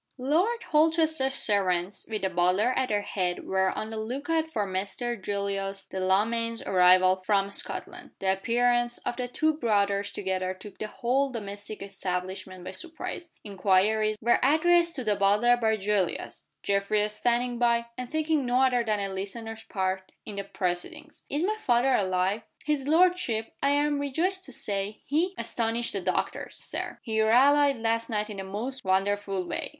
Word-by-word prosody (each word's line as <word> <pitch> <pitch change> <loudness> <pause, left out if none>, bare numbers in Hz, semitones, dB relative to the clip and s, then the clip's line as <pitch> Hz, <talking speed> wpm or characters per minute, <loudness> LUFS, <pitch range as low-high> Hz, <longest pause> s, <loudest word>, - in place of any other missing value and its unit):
LORD 345 - +1
HOLCHESTER'S 315 -3 +3
servants 190 -4 +1
with 215 -3 -3
the 190 - +2
butler 180 +7 +2
at 255 - 0
their 205 -1 0
head 180 -3 -2
were 190 0 +1
on 215 +3 -4
the 220 - -5
look 260 +8 -4
out 320 0 +1
for 210 -8 -1
Mr. 200 +6 -3
Julius 195 -1 -3
Delamayn's 225 +5 0
arrival 185 0 +5
from 195 +1 0
Scotland. - - -4
The 190 0 +1
appearance 240 +4 +1
of - - -1
the 250 -1 -2
two 315 +5 +1
brothers 205 -7 +1
together 185 -1 -2
took 195 +1 -12
the 215 - -3
whole 260 +5 0
domestic 205 -3 -7
establishment 185 -1 -5
by - - -6
surprise. 335 0 -6
Inquiries 210 +2 +2
were 235 +2 +3
addressed 335 +4 +4
to 260 - -4
the 210 -2 +1
butler 205 +5 +4
by 220 -2 +1
Julius; 200 -3 -2 0.2
Geoffrey 200 +1 +1
standing 240 +3 0
by, 235 -1 +3
and 250 0 -6
taking 315 -1 +1
no 250 +1 +2
other 250 -2 +3
than 215 -2 0
a 195 -1 -3
listener's 225 +3 -6
part 190 -1 -2
in 205 - -7
the 200 - -2
proceedings. 180 -2 -4
"Is 295 +3 -1
my 425 +3 0
father 245 +2 +3
alive?" 190 0 +1 0.2
"His 290 -2 0
lordship, 320 -9 +2
I 280 - +3
am 290 0 +2
rejoiced 345 +7 -1
to 265 - -11
say, 205 -2 -4
has 325 +5 +2
astonished 230 0 -2
the 200 - -2
doctors, 185 0 -2
Sir. - - -4
He 220 -3 0
rallied 275 +6 +5
last 230 0 -1
night 215 -1 -1
in 205 - -7
the 195 - -4
most 230 +8 -4
wonderful 195 0 0
way. - - -3
220 Hz, 165 wpm, -27 LUFS, 195-260 Hz, 0.2 s, arrival